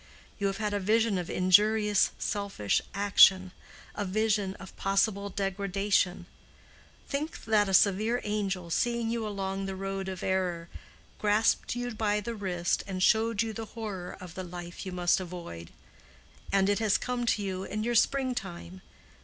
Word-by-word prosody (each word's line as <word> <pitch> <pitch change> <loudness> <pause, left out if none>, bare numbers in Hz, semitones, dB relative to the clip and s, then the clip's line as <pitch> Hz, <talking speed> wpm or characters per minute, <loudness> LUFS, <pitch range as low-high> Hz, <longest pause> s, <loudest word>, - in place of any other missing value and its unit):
You 200 - +1
have 195 - -2
had 210 -1 -2
a 205 - 0
vision 215 0 +2
of 175 - -5
injurious, 210 +3 +4
selfish 200 - -1
action—a 195 0 +3
vision 205 0 0
of 195 - -12
possible 200 +1 +1
degradation; 195 -2 0 0.8
think 300 +3 -4
that 210 -2 +3
a - - -2
severe 215 +5 +3
angel, 195 -5 -2
seeing 235 +2 0
you 230 -2 -2
along 195 -1 -3
the 190 - -4
road 195 0 -4
of 185 -2 -6
error, 180 -3 -1 0.5
grasped 215 +3 +2
you 245 0 -3
by 210 -1 0
the 230 +3 -4
wrist 180 -5 -1
and 185 -1 -2
showed 220 0 +3
you 225 -1 -4
the 225 +1 -5
horror 195 -5 -5
of 180 -2 -10
the 185 - -5
life 175 +1 -8
you - - -4
must 180 0 +2
avoid. 170 - -8 0.8
And 195 -1 +3
it 205 +1 +2
has 215 -3 +3
come 245 -1 -3
to 210 - +1
you 190 -1 -3
in 215 +2 -4
your 240 +1 0
spring 260 +2 +2
time. 185 -3 -7
200 Hz, 160 wpm, -29 LUFS, 185-215 Hz, 0.8 s, injurious